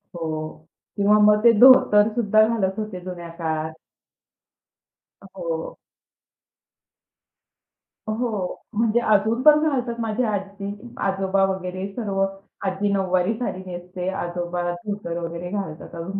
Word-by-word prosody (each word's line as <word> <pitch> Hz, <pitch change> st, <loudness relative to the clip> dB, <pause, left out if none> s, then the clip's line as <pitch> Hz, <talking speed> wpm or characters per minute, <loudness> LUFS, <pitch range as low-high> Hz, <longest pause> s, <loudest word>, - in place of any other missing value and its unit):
हो, 155 Hz, -1 st, -5 dB, 0.3 s
किंवा 205 Hz, +1 st, +4 dB
मग 210 Hz, 0 st, +5 dB
ते 235 Hz, -, +8 dB
धोतरसुद्धा 215 Hz, -3 st, +6 dB
घालत 195 Hz, -5 st, 0 dB
होते 215 Hz, -4 st, -5 dB
जुन्या 175 Hz, -1 st, -8 dB
काळात. 160 Hz, -1 st, -2 dB, 1.5 s
हो. -, -, -5 dB, 2.3 s
हो, 215 Hz, -4 st, -3 dB
म्हणजे 230 Hz, +2 st, +2 dB
अजून 220 Hz, +4 st, +2 dB
पण 300 Hz, +1 st, +7 dB
घालतात, 245 Hz, -4 st, -2 dB
माझी 225 Hz, +2 st, -1 dB
आजी, 200 Hz, -2 st, -3 dB, 0.3 s
आजोबा 195 Hz, 0 st, +1 dB
वगैरे 185 Hz, +1 st, -5 dB
सर्व. 195 Hz, -3 st, -1 dB, 0.4 s
आजी 195 Hz, +1 st, 0 dB
नऊवारी 185 Hz, +1 st, +1 dB
साडी 240 Hz, -6 st, -3 dB
नेसते, 180 Hz, 0 st, -6 dB
आजोबा 175 Hz, -1 st, -3 dB
धोतर 175 Hz, -1 st, -5 dB
वगैरे 170 Hz, +1 st, -5 dB
घालतात 190 Hz, -7 st, -5 dB
अजून 185 Hz, +4 st, -5 dB
195 Hz, 105 wpm, -23 LUFS, 180-215 Hz, 2.3 s, ते